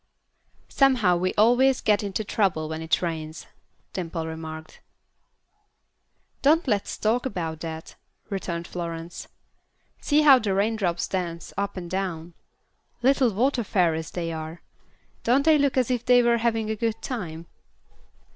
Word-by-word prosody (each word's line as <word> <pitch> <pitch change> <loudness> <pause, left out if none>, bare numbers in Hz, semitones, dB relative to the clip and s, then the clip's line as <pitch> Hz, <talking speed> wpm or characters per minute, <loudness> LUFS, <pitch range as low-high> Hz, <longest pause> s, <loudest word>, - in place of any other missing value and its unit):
"Somehow 250 -10 +3
we 185 +1 0
always 245 +5 +4
get 210 -1 +2
into 205 +1 -3
trouble 190 -7 0
when 160 0 -5
it 160 +2 0
rains," 160 -2 -4 0.5
Dimple 165 -3 -4
remarked. 160 -1 -8 1.6
"Don't 310 +3 +3
let's 205 -5 -1
talk 235 +4 +1
about 165 -8 -4
that," 160 -1 -7 0.4
returned 170 -3 -3
Florence. 170 -1 -6 0.7
"See 300 0 +2
how 275 -3 +8
the 205 -4 -1
raindrops 200 -4 0
dance 170 -3 -4
up 200 0 -3
and 175 -2 -5
down. 175 -3 -4 0.7
Little 265 -2 +4
water 245 +4 +1
fairies 165 -6 0
they 170 -2 -4
are. 160 +1 -7 0.6
Don't 265 +5 +3
they 315 -2 +5
look 280 -2 +1
as 255 -1 +2
if 245 -2 -1
they 245 -1 +5
were 235 0 +3
having 225 -2 0
a - - -1
good 225 0 -2
time?" 170 -10 -5
195 Hz, 135 wpm, -25 LUFS, 165-240 Hz, 1.6 s, how